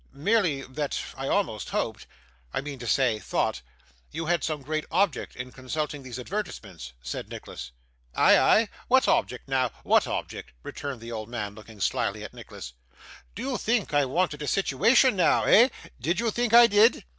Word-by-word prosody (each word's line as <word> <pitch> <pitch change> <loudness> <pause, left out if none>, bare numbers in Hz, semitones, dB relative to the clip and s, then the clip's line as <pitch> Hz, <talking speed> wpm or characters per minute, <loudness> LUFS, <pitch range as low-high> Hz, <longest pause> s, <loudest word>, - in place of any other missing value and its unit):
'Merely 160 -2 +1
that 140 +2 -3 0.2
I 135 0 -4
almost 125 - -1
hoped - - -3 0.5
I - - +1
mean 140 -1 -6
to 120 - -6
say, 120 -4 +2
thought - - -1 0.5
you 165 +2 -5
had 170 0 +1
some 150 -3 -3 0.2
object 180 -3 0
in 125 0 -7
consulting 145 +3 -4
those 130 -2 -8
advertisements,' 105 - -6
said - - -5
Nicholas. - - -8 0.5
'Ay, - - +6
ay? 220 -1 +4 0.2
what 260 +1 +4
object 125 +1 0
now 130 -2 +1
what - - +3
object?' - - -5
returned 140 -5 -6
the 115 +1 -8
old 110 -1 -5
man, 105 -4 -4
looking 110 0 -13
slyly - - -1
at - - -8
Nicholas. 60 - -10 0.6
'Did 230 - -5
you 260 -2 -1
think 225 -7 0
I 145 -1 +4
wanted 150 +2 -1
a 150 - -4
situation 210 - +3
now 180 - +3
eh? 240 +5 +6 0.3
Did 170 - 0
you 230 -1 +1
think 240 +1 -1
I 240 0 +10
did? 220 +2 +4
145 Hz, 170 wpm, -26 LUFS, 125-200 Hz, 0.6 s, I